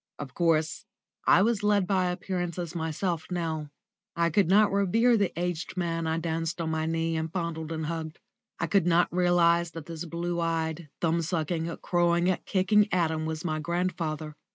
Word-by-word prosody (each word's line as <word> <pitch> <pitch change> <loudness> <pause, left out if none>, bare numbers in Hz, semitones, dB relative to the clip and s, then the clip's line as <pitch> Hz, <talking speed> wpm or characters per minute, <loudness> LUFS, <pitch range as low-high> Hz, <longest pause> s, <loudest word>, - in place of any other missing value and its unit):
Of 135 -3 -7
course, 160 -2 +1 0.4
I 185 - +6
was 230 -1 +1
led 205 -2 +3
by 185 -1 +1
appearances 175 -2 -3
myself 160 0 -2
now. 160 -4 -3 0.5
I 170 0 +1
could 195 +2 +3
not 205 +2 +5
revere 220 +5 +3
the 200 -4 +1
aged 175 0 -3
man 165 -2 -1
I 160 0 0
danced 165 +1 -2
on 160 -1 -1
my 160 0 -1
knee 165 0 0
and 160 0 -2
fondled 165 -3 -3
and 160 -1 -3
hugged. 160 0 -4 0.4
I - - 0
could 175 +1 +2
not 175 0 +3
realise 170 -1 +3
that 165 -2 -9
this 165 +1 -6
blue 170 +1 -3
eyed, 165 -1 -2
thumb 170 0 +2
sucking, 165 0 -2
crowing, 175 +1 +2
kicking 205 +2 +3
atom 160 -3 0
was 160 +1 -4
my 155 -2 -1
grandfather. 160 -2 -2
170 Hz, 170 wpm, -28 LUFS, 160-180 Hz, 0.5 s, I